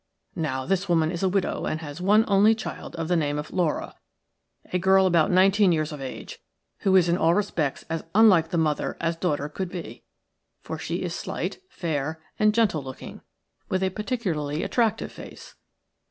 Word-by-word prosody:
Now, 130 -6 -2
this 195 +2 -1
woman 165 -2 +2
is 170 - -4
a 190 - +2
widow 190 0 -1
and 155 - -2
has 150 +2 -7
one 210 +4 +4
only 205 +2 +5
child 220 - -7
of 165 -1 -3
the 175 - +2
name 145 -3 0
of 150 - -5
Laura, 175 -5 -1 0.8
a 180 - +2
girl 190 +1 +4
about 170 -4 +3
nineteen 190 +1 +4
years 155 -2 0
of 150 -2 -7
age, 130 -1 -7 0.4
who 190 -1 +2
is 180 -2 +5
in 170 +1 +2
all 165 +1 +3
respects 170 -8 -1
as 165 0 -3
unlike 190 -7 +6
the 170 - -1
mother 155 -2 0
as 165 0 -1
daughter 150 -4 -1
could 180 +4 -5
be, 175 -2 -8 0.6
for - - -6
she - - -3
is - - -3
slight, - - -4
fair, 160 - -3 0.2
and 215 0 +3
gentle 215 -10 +2
looking, 130 -1 -9 0.5
with 185 0 0
a 190 - +1
particularly 180 - -2
attractive 230 -4 0
face. - - -11
175 Hz, 185 wpm, -25 LUFS, 155-195 Hz, 0.8 s, unlike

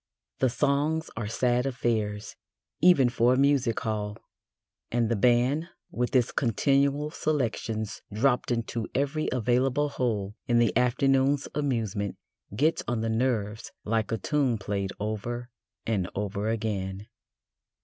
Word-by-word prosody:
The 130 - +3
songs 145 +5 0
are 110 -2 -3
sad 125 +3 +1
affairs, 110 -5 -2 0.5
even 165 -7 +6
for 120 +1 +3
a - - -1
music 135 -4 +2
hall, 105 -2 -3 0.7
and 120 -2 +1
the 115 - +2
band, 125 +8 +2 0.2
with 125 +3 -2
its 125 -3 +3
continual 140 +5 +1
"selections" 115 -8 -2
dropped 125 +4 +1
into 115 -2 -2
every 145 +3 0
available 130 +4 +1
hole 110 -7 -2
in 120 - +3
the 120 -1 +3
afternoon's 135 +3 +2
amusement, 115 -8 -1 0.4
gets 155 +8 +2
on 120 -2 -1
the 115 - -1
nerves 110 -3 -1
like 110 0 0
a 115 - +1
tune 130 +2 +1
played 100 -2 -3
over 120 +4 -4 0.3
and 100 -5 0
over 105 +1 -2
again. 105 -3 -2
120 Hz, 130 wpm, -27 LUFS, 110-135 Hz, 0.7 s, even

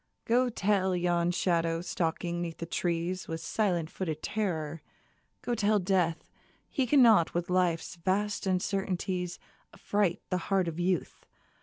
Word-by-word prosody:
Go 245 +2 +3
tell 195 -4 +1
yon 175 -1 +1
shadow 165 -2 +1
stalking 175 0 -2
'neath 165 -2 -4
the 170 - -5
trees 175 +2 -2
With 165 -1 -4
silent 175 -2 -1
footed 160 -5 -4
terror, 165 -7 -2 0.6
go 240 - -1
tell 215 -2 +2
Death 180 -4 0 0.4
He 265 -5 0
cannot 230 - +5
with 175 +1 -1
Life's 180 -1 +1
vast 195 +3 -1
uncertainties 185 -1 -1 0.3
Affright 200 -3 0
the 180 - +1
heart 190 -3 +2
of 165 0 -4
Youth 180 -1 -1
180 Hz, 135 wpm, -30 LUFS, 170-195 Hz, 0.6 s, cannot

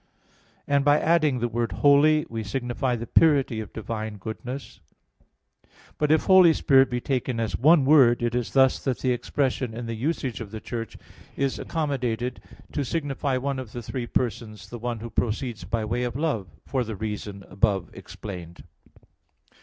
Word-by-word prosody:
And 140 -1 +2
by 145 +1 +4
adding 155 -5 +2
the 120 0 0
word 115 -2 -2
"holy" 145 +7 +4
we 115 -1 -4
signify 120 +3 -2
the 120 0 -5
purity 140 -4 +3
of 110 - -7
divine 110 -1 -5
goodness. 120 +6 -7 1.2
But 150 0 +2
if 155 - +4
Holy 185 -3 +7
Spirit 135 -3 +4
be 125 -1 -1
taken 130 -2 -2
as 115 -2 -1
one 150 +1 +5
word, 130 -5 +5
it 120 0 0
is 120 -2 -2
thus 130 -1 +4
that 130 -3 0
the 130 - +1
expression, 125 -1 -1
in 120 +1 -5
the 115 - -4
usage 130 0 -2
of 110 - -7
the 110 +1 -7
Church, 115 0 -6 0.4
is 140 -1 -1
accommodated 125 -6 -2 0.3
to 145 - -1
signify 140 -2 -1
one 135 +1 -2
of 125 -5 -8
the 120 - -6
three 120 +2 -4
persons, 115 -3 -3
the 120 - -6
one 120 0 -3
who 115 0 -7
proceeds 115 -3 -2
by 110 +3 -2
way 120 +3 -1
of 120 -1 -2
love, 140 - -1 0.2
for 130 -2 -1
the 110 -2 -5
reason 105 -1 -5
above 100 -1 0
explained. 90 -4 -9
120 Hz, 170 wpm, -25 LUFS, 110-140 Hz, 1.2 s, Holy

